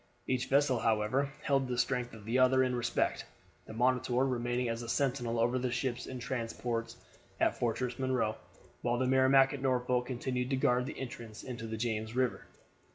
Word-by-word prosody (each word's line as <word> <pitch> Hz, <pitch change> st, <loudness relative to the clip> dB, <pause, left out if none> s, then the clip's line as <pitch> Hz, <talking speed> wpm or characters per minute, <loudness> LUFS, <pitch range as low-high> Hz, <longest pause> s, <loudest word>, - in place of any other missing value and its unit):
Each 130 Hz, 0 st, -1 dB
vessel 135 Hz, -2 st, +3 dB
however 115 Hz, +6 st, +1 dB
held 135 Hz, -2 st, +2 dB
the 125 Hz, -1 st, -2 dB
strength 125 Hz, -2 st, 0 dB
of 105 Hz, -2 st, -12 dB
the 120 Hz, +4 st, +1 dB
other 130 Hz, 0 st, +5 dB
in 125 Hz, -1 st, 0 dB
respect, 120 Hz, -, 0 dB, 0.4 s
the -, -, -8 dB
Monitor 125 Hz, +2 st, +2 dB
remaining 120 Hz, -1 st, -1 dB
as 115 Hz, 0 st, -2 dB
sentinel 125 Hz, -4 st, 0 dB
over 120 Hz, +2 st, +2 dB
the 125 Hz, -1 st, -1 dB
ships 120 Hz, 0 st, -2 dB
and 130 Hz, -1 st, -6 dB
transports 115 Hz, -1 st, -3 dB, 0.4 s
at -, -, +2 dB
Fortress 125 Hz, +1 st, -1 dB
Monroe, 125 Hz, -5 st, 0 dB, 0.5 s
while 120 Hz, 0 st, 0 dB
the 130 Hz, -, +1 dB
Merrimac 130 Hz, +1 st, +5 dB
at 140 Hz, -, -5 dB
Norfolk 125 Hz, -1 st, +1 dB
continued 125 Hz, 0 st, -2 dB
to 135 Hz, -, +1 dB
guard 125 Hz, -2 st, +2 dB
the -, -, -6 dB
entrance 115 Hz, -4 st, -7 dB
into 120 Hz, -3 st, -6 dB
the 110 Hz, 0 st, -4 dB
James 110 Hz, 0 st, -2 dB
River. 125 Hz, -1 st, 0 dB
125 Hz, 175 wpm, -32 LUFS, 120-130 Hz, 0.5 s, other